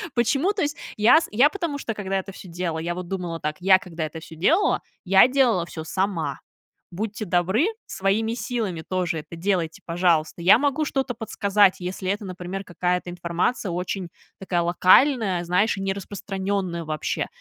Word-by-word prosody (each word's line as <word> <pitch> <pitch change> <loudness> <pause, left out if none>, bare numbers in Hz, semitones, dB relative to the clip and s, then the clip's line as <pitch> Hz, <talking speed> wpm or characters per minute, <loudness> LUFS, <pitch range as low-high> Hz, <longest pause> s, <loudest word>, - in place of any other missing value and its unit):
Почему, 270 - +2
то 410 - -3
есть, 290 0 -1 0.2
я 230 +10 +6
с 330 - -4
Я, 250 +7 +5
потому 335 -6 -3
что, 230 - -3
когда 195 -2 -2
это 195 +1 -7
всё 185 - -11
делала, 170 -1 -3
я 170 +2 -3
вот 180 0 -6
думала 175 -3 -4
так: 150 +1 -3
я 190 +1 +5
когда 170 -4 -5
это 155 +1 -7
всё 160 - -11
делала, 330 - +2 0.2
я 190 +4 +7
делала 250 -10 +2
всё 160 -2 -7
сама. 165 -6 -2 0.5
Будьте 215 +3 -4
добры, 190 - +2 0.2
своими 210 +4 0
силами 220 -10 -3
тоже 180 -3 -1
это 155 - -10
делайте, 170 -2 -1
пожалуйста. 170 -1 +1
Я 185 +5 +7
могу 285 +2 +1
что-то 270 -2 -1
подсказать, 205 -3 +2
если 185 +1 -4
это, 205 +1 -3
например, 185 +1 -6
какая-то 180 0 -1
информация 175 +5 -1
очень 180 +1 -3 0.3
такая 180 -2 -1
локальная, 185 +3 +4
знаешь, 185 +5 +2
и - - -4
не 195 0 0
распространенная 195 -2 -3
вообще. 155 -1 -2
190 Hz, 170 wpm, -24 LUFS, 175-220 Hz, 0.5 s, я